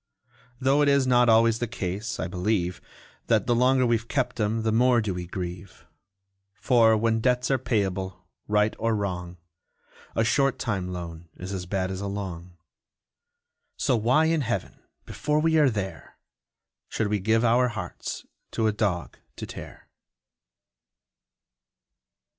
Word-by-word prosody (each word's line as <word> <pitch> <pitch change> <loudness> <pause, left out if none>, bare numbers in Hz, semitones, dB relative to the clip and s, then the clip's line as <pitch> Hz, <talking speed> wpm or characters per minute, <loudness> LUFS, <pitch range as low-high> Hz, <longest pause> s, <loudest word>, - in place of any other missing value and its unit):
Though 135 +2 +3
it 145 - +4
is 140 -1 +3
not 125 -1 +4
always 115 0 +4
the 120 - -1
case, 110 +3 -4
I - - -1
believe, 90 -1 -1 0.5
That - - +2
the 120 - +2
longer 130 +2 +3
we've 115 -1 0
kept 125 -3 -1
'em, 110 +1 0
the 110 - +1
more 120 +2 +4
do 105 -4 -1
we 90 -1 -5
grieve: 90 +1 -7 0.7
For, 115 -2 +4
when 115 +1 +1
debts 125 +2 +1
are 135 - +2
payable, 95 -6 -2 0.2
right 105 +1 +2
or 115 0 +1
wrong, 90 -3 -4 0.8
A 115 - +2
short 135 +3 +2
time 100 -6 -2
loan 85 -2 -7
is 95 +2 -6
as 90 -2 -5
bad 95 0 -1
as 95 0 -5
a 100 - -3
long 90 -3 -6 1.2
So 130 - +1
why 125 +8 +3
in 160 -1 +2
Heaven 120 -6 -3 0.3
(before 150 0 -1
we 160 0 +3
are 145 -3 +5
there!) 95 -7 -5 0.7
Should 110 - -1
we 105 0 0
give 110 +4 +2
our 120 +2 +4
hearts 105 -7 -6 0.3
to 110 - 0
a 110 - +3
dog 100 -5 -2 0.2
to - - -6
tear? - - -10
110 Hz, 150 wpm, -26 LUFS, 95-125 Hz, 1.2 s, are